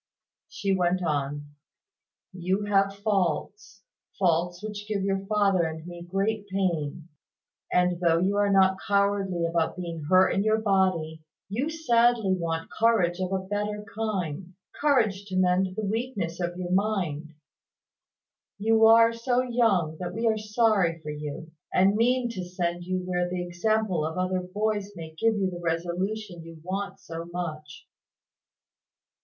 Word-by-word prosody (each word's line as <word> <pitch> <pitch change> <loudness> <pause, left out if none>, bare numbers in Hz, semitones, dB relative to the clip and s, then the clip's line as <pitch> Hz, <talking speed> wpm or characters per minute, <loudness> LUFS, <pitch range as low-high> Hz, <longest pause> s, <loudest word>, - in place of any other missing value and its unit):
She 195 -1 -1
went 180 0 +1
on 145 -2 -2 0.8
"You 185 +3 -1
have 195 -1 +2
faults, 195 0 -1 0.3
faults 175 0 +1
which 210 -1 -6
give 205 -3 -1
your 195 0 -1
father 200 -3 +3
and 160 -1 -3
me 175 -1 -8
great 200 +4 -2
pain; 170 -5 -2 0.6
and 180 -1 +2
though 170 -2 +3
you 190 +4 +1
are 205 0 +3
not 190 -1 +4
cowardly 200 -3 +1
about 165 +1 0
being 170 -4 -5
hurt 185 0 +6
in 195 - +1
your 215 0 +3
body, 185 -7 0 0.3
you 245 +10 -1
sadly 240 -9 +2
want 165 -2 -3
courage 200 -6 +2
of 185 0 -2
a 190 -1 -1
better 210 +1 -3
kind, 185 -5 -3 0.2
courage 225 -10 +1
to 190 -2 -6
mend 185 0 +2
the 215 0 -2
weakness 205 -6 -3
of 175 0 -3
your 180 -1 -4
mind. 180 -6 -1 1.2
You 220 +2 +4
are 230 +1 +7
so 245 +2 0
young 215 -11 +1
that 180 0 -5
we 230 - -2
are 225 -1 +3
sorry 210 -5 +2
for 150 - -4
you, 150 +2 -6 0.2
and 195 +2 +4
mean 245 +2 +2
to 190 -6 -5
send 175 -1 -3
you 185 0 -2
where 180 -1 -1
the 180 0 -2
example 190 0 0
of 160 +2 -3
other 185 0 0
boys 205 +2 -2
may 160 -2 -8
give 225 +6 +2
you 190 -2 0
the 175 -1 -7
resolution 175 +3 -2
you 165 0 -11
want 195 +2 -4
so 165 0 -7
much." 155 -5 -6
190 Hz, 150 wpm, -27 LUFS, 175-210 Hz, 1.2 s, are